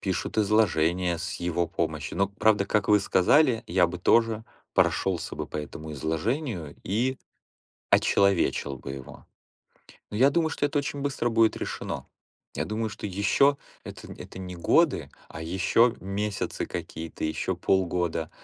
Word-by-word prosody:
пишут 95 +3 -2
изложения 90 -5 +2
с 85 +1 -4
его 85 0 -1
помощью. - - -3
Но, 100 - +3
вот 100 - -20
правда, 105 -2 +4
как 105 0 0
вы 105 -1 +6
сказали, 115 - +3
я 90 0 +3
бы 85 +1 -6
тоже 115 +3 +3 0.3
прошелся 95 -3 +1
бы - - -4
по - - -7
этому 75 +1 -7
изложению 80 - -2
и 125 +7 0 0.7
очеловечил 95 -8 +2
бы - - -7
его. 65 -2 -11 0.8
Но 105 - -5
я 135 - +6
думаю, 160 +2 +1
что 145 - 0
это 145 0 -1
очень 145 0 -3
быстро 135 -4 -1
будет 115 -1 +3
решено. - - -5 0.5
Я - - -2
думаю, 110 +1 -2
что 105 - -6
еще 100 +9 +3 0.3
это - - -10
это - - -10
не 90 -1 -6
годы, 85 - +2 0.2
а 80 - -8
еще 95 +8 +3
месяцы 100 +1 -3
какие-то, 80 0 -6
еще 80 - -1
полгода, 85 -4 0
100 Hz, 150 wpm, -27 LUFS, 85-115 Hz, 0.8 s, вы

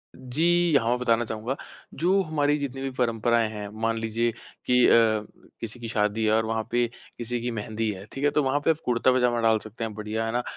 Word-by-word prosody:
जी। 165 +6 +2
हाँ, 115 -4 +3
मैं 125 - +2
बताना 120 -1 +2
चाहूँगा 110 +4 -3 0.4
जो 185 +6 +2
हमारी 150 -2 +1
जितनी 135 -2 -4
भी 135 - -2
परंपराएँ 115 -2 +1
हैं, 105 -1 -6
मान 115 0 +1
लीजिए 115 +1 0 0.3
कि 125 0 +4
अ, - - +5 0.7
किसी 115 +1 -5
की 115 - -6
शादी 105 0 0
है 110 - +3
और 110 0 +2
वहाँ 110 0 -1
पे 120 0 +2 0.3
किसी 120 +1 -3
की 120 - -2
मेहंदी 110 0 -3
है, 95 0 -8
ठीक 135 - -6
है, 145 - +5
तो 150 -1 +2
वहाँ 135 +2 +1
पे - - +3
आप 160 - -2
कुर्ता-पजामा 125 0 +2
डाल 115 -1 +4
सकते 110 +2 -8
हैं 110 -2 -3
बढ़िया 110 +1 -3
है 115 - -2
ना, 120 +1 -1
120 Hz, 220 wpm, -26 LUFS, 110-130 Hz, 0.7 s, अ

